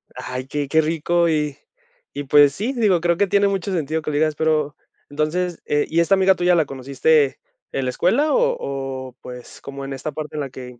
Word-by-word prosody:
Ay, 125 Hz, +1 st, -6 dB
qué 145 Hz, 0 st, -3 dB
qué 160 Hz, +3 st, +3 dB
rico, 165 Hz, +2 st, +1 dB
y 150 Hz, -3 st, -1 dB, 0.6 s
y 145 Hz, -, -3 dB
pues 145 Hz, 0 st, +6 dB
sí, 220 Hz, -, -3 dB
digo, 210 Hz, -9 st, +2 dB
creo 170 Hz, 0 st, +1 dB
que 200 Hz, -, +3 dB
tiene 200 Hz, +1 st, +3 dB
mucho 195 Hz, -1 st, -2 dB
sentido 160 Hz, -3 st, -1 dB
que 155 Hz, -, -3 dB
le 145 Hz, -, -1 dB
digas, 155 Hz, 0 st, +1 dB
pero 155 Hz, -2 st, 0 dB, 0.3 s
entonces, 160 Hz, +4 st, -2 dB
¿y 150 Hz, +3 st, 0 dB
esta 170 Hz, +3 st, +3 dB
amiga 190 Hz, 0 st, +4 dB
tuya 180 Hz, 0 st, +2 dB
la 165 Hz, -3 st, +3 dB
conociste 140 Hz, +2 st, +1 dB, 0.3 s
en 135 Hz, -, -2 dB
la -, -, 0 dB
escuela 230 Hz, -, +1 dB
o -, -, +2 dB
o, 135 Hz, -2 st, -5 dB
pues, 125 Hz, -1 st, -10 dB
cómo, 140 Hz, 0 st, -8 dB
en 135 Hz, -, -5 dB
esta 135 Hz, +3 st, -5 dB
parte 150 Hz, +1 st, -7 dB
en 150 Hz, -, -2 dB
la 140 Hz, -, -4 dB
que? 125 Hz, -2 st, -10 dB
155 Hz, 210 wpm, -21 LUFS, 140-175 Hz, 0.6 s, pues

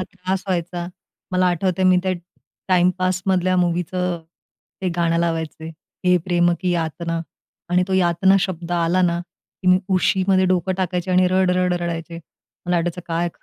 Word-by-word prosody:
इतका -, -, 0 dB
त्रास 185 Hz, 0 st, -2 dB
व्हायचा. 175 Hz, -1 st, -2 dB, 0.5 s
मला 185 Hz, 0 st, +3 dB
आठवतंय 185 Hz, +1 st, 0 dB
मी 185 Hz, 0 st, +5 dB
त्या 190 Hz, 0 st, 0 dB, 0.6 s
टाईमपासमधल्या 185 Hz, 0 st, +2 dB
मूवीचं 180 Hz, 0 st, 0 dB, 0.6 s
ते 185 Hz, -, +1 dB
गाणं 170 Hz, -1 st, +1 dB
लावायचे 160 Hz, -1 st, -2 dB, 0.4 s
हे 180 Hz, 0 st, +5 dB
प्रेम 175 Hz, -1 st, +2 dB
की 180 Hz, -1 st, 0 dB
यातना. 165 Hz, 0 st, -2 dB, 0.5 s
आणि 180 Hz, +1 st, +3 dB
तो -, -, -2 dB
यातना 185 Hz, +1 st, +3 dB
शब्द 175 Hz, -2 st, -3 dB
आला 175 Hz, +1 st, +2 dB
ना, 170 Hz, -1 st, +2 dB
की 185 Hz, +1 st, -7 dB
मी 185 Hz, 0 st, +6 dB, 0.2 s
उशीमध्ये 190 Hz, 0 st, +2 dB
डोकं 180 Hz, +1 st, -1 dB
टाकायचे 180 Hz, -1 st, -2 dB
आणि 185 Hz, 0 st, +4 dB
रड-रड 180 Hz, -1 st, +2 dB
रडायचे. 165 Hz, 0 st, -4 dB, 0.5 s
मला 180 Hz, 0 st, +1 dB
वाटायचं 175 Hz, +1 st, -1 dB
काय 170 Hz, +1 st, -1 dB
180 Hz, 150 wpm, -21 LUFS, 170-185 Hz, 0.6 s, मी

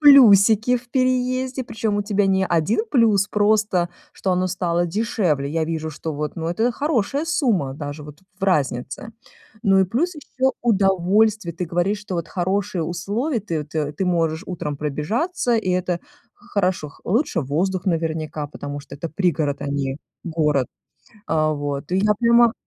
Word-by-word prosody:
плюсики 230 Hz, -5 st, +7 dB
в 245 Hz, +1 st, -19 dB
переезде, 255 Hz, 0 st, 0 dB
причём 220 Hz, -3 st, -2 dB
у -, -, 0 dB
тебя 205 Hz, -1 st, +1 dB
не 190 Hz, 0 st, +2 dB
1 175 Hz, +7 st, +2 dB
плюс, 220 Hz, -6 st, +4 dB
просто 210 Hz, -4 st, +2 dB, 0.2 s
что 190 Hz, -, -1 dB
оно 180 Hz, +1 st, +1 dB
стало 175 Hz, -1 st, 0 dB
дешевле. 170 Hz, -7 st, 0 dB
Я 160 Hz, +1 st, 0 dB
вижу, 160 Hz, -1 st, -3 dB
что 155 Hz, +1 st, -5 dB
вот, 150 Hz, +1 st, -4 dB
ну, 165 Hz, -1 st, -3 dB
это 225 Hz, +8 st, +1 dB
хорошая 285 Hz, +1 st, 0 dB
сумма 225 Hz, -, +1 dB
даже 145 Hz, +1 st, -6 dB
вот 150 Hz, 0 st, -12 dB, 0.2 s
в -, -, -19 dB
разнице. 145 Hz, -, 0 dB, 0.5 s
Ну 195 Hz, -4 st, +4 dB
и -, -, +5 dB
плюс 285 Hz, -, -1 dB
ещё 265 Hz, -3 st, -1 dB
удовольствие, 200 Hz, -2 st, +2 dB
ты 180 Hz, +1 st, -3 dB
говоришь, 175 Hz, +5 st, 0 dB
что 205 Hz, -3 st, -6 dB
вот 170 Hz, -1 st, -3 dB
хорошие 190 Hz, 0 st, -1 dB
условия, 205 Hz, -, -2 dB
ты 165 Hz, -6 st, -3 dB
ты 150 Hz, -1 st, -3 dB
ты 170 Hz, +6 st, -2 dB
можешь 165 Hz, -2 st, +1 dB
утром 150 Hz, -5 st, -4 dB
пробежаться, 215 Hz, -, -1 dB
и 220 Hz, -4 st, 0 dB
это 180 Hz, -1 st, 0 dB, 0.3 s
х 240 Hz, -, -23 dB
хорошо. 185 Hz, -6 st, +1 dB
Х 140 Hz, -, -19 dB
лучше 220 Hz, -, +1 dB
воздух 175 Hz, +7 st, -1 dB
наверняка, 160 Hz, -3 st, -1 dB
потому 145 Hz, 0 st, -6 dB
что 140 Hz, -, -11 dB
это 155 Hz, +4 st, -5 dB
пригород, 155 Hz, -5 st, 0 dB
а -, -, -4 dB
не 140 Hz, 0 st, -2 dB, 0.2 s
город. 150 Hz, -6 st, +1 dB, 0.6 s
Э, 155 Hz, -1 st, +2 dB
вот. 145 Hz, 0 st, -4 dB
И -, -, +3 dB
я 210 Hz, +2 st, +3 dB
понима. 235 Hz, 0 st, +5 dB
185 Hz, 165 wpm, -22 LUFS, 155-220 Hz, 0.6 s, плюсики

